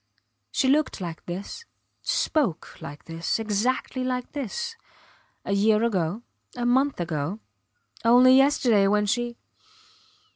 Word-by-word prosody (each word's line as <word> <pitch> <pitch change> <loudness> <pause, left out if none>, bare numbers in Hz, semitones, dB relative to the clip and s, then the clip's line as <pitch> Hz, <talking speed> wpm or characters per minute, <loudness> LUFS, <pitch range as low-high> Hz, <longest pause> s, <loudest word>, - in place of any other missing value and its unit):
She 265 - +1
looked 300 +3 +2
like 170 -3 -6
this, 190 - -6 0.4
spoke 270 - -1
like 145 +1 -9
this, 165 +1 -2
exactly 225 +4 -1
like 250 -1 -3
this, 295 - -4 0.7
a - - -3
year 210 +2 +3
ago, 200 -1 -1 0.3
a 245 -1 -2
month 265 +2 +2
ago 165 +2 -2 0.7
only 250 +2 +7
yesterday 255 -7 +4
when 210 +1 +2
she. 240 +3 -1
230 Hz, 115 wpm, -25 LUFS, 195-255 Hz, 0.7 s, only